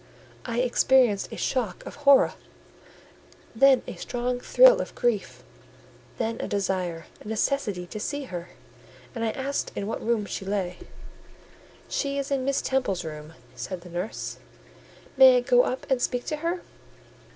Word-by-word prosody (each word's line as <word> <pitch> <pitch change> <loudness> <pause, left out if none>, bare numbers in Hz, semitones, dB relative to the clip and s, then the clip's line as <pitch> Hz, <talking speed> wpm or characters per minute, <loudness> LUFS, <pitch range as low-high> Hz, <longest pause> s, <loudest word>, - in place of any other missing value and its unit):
I 235 0 0
experienced 250 -4 +3
a - - -7
shock 235 -9 -2
of - - -7
horror, 280 -2 +5 1.2
then 270 +2 +5
a - - -6
strong 245 0 -2
thrill - - +6
of - - -7
grief, 235 -5 -1 0.7
then 230 -1 -2
a - - -3
desire—a 185 -3 -3
necessity 215 -4 -1
to 215 +4 -7
see 285 +6 -3
her; 180 -8 -7 0.6
and 230 - -4
I 225 - +1
asked 270 +5 -3
in 200 - -3
what 225 - -4
room 225 -2 0
she 200 - -5
lay. 190 -2 -2 1.1
"She 280 -1 -2
is 280 0 -3
in 270 -2 0
Miss 275 0 0
Temple's 255 -10 -1
room," 155 0 -8 0.2
said 185 -2 -6
the 180 0 -12
nurse. 180 +5 -4 0.8
"May 260 -1 +8
I - - +2
go 245 0 +5
up 255 - -3
and 260 -2 +1
speak 245 -1 -1
to 305 - -2
her?" 340 +3 -2
240 Hz, 150 wpm, -26 LUFS, 195-265 Hz, 1.2 s, May